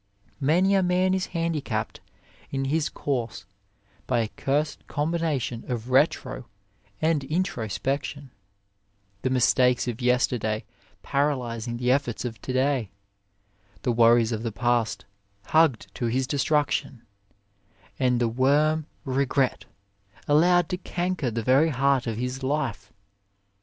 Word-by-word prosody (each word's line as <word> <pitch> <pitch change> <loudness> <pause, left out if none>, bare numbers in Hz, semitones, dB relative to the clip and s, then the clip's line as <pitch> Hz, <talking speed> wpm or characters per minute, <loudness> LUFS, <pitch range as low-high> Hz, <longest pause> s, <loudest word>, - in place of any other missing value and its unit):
Many 175 +8 +3
a 195 - +4
man 185 +1 +2
is 190 -1 -1
handicapped 140 -10 -2 0.5
in 135 -1 -2
his 155 +2 0
course 120 -7 -3 0.6
by 120 -2 +2
a 110 - -2
cursed 150 +5 -2
combina 160 -1 0
tion 120 -1 -5
of 120 +1 -4
retro 130 -3 +1 0.6
and 160 -3 +2
intro 150 -7 -1
spection, 135 +4 -3 0.9
the 130 - 0
mistakes 125 0 +3
of 120 -1 -4
yesterday 125 -3 +1 0.4
para 145 +1 +1
lysing 120 -1 -5
the 125 +1 +1
efforts 130 -3 0
of 115 -2 -6
to - - -4
day, 130 -4 +1 0.9
the 125 - +1
worries 115 0 +4
of 110 -1 -2
the 115 -1 -3
past 120 0 0 0.4
hugged 155 -7 +2
to 120 - -2
his 130 +3 0
destruction, 145 -2 0 1.0
and 125 -2 +2
the 120 - +2
worm 145 +6 +2 0.2
Regret 135 0 0 0.6
allowed 175 +3 +4
to 180 - -2
canker 180 -6 -2
the 115 0 -3
very 135 +7 +4
heart 135 -2 +1
of 115 -2 -2
his 125 +2 -3
life. 130 -7 -2
130 Hz, 130 wpm, -26 LUFS, 120-150 Hz, 1.0 s, a